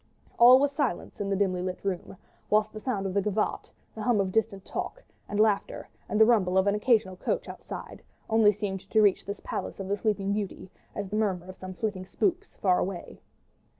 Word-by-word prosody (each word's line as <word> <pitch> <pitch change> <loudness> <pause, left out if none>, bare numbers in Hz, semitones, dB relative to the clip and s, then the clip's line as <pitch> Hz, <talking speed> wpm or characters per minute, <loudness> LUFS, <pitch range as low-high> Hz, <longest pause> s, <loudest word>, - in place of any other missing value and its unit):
All 245 +2 +10
was 280 +1 +2
silence 205 -8 -2
in 200 - -2
the 195 - +1
dimly 185 -2 +1
lighted 185 +1 -5
room, 190 -1 -3 0.3
whilst 215 0 +2
the 215 - -6
sound 210 -4 -2
of 190 - -2
the 200 - +2
gavotte, 210 +2 -1 0.2
the 220 - -7
hum 235 -1 +2
of 190 -1 0
distant 205 -2 0
talk - - -5 0.3
and 205 - -2
laughter, 215 -2 +1 0.2
and 210 - 0
the 220 - +9
rumble 195 -6 +3
of 190 - +4
an 200 - +3
occasional 210 -3 +2
coach - - -2
outside, - - -8 0.3
only 220 -2 +5
seemed 200 -2 -3
to 220 - +4
reach 200 -2 +3
this 200 0 -5
palace - - -4
of 195 - -4
the 200 - +1
Sleeping 200 -2 0
Beauty 200 -2 -4 0.2
as 200 -1 -3
the 210 - -2
murmur 190 -5 0
of 185 0 -9
some 185 0 -8
flitting 190 -3 -3
spooks 385 - -1
far 185 -2 +2
away. 180 -2 -5
205 Hz, 210 wpm, -28 LUFS, 190-220 Hz, 0.3 s, All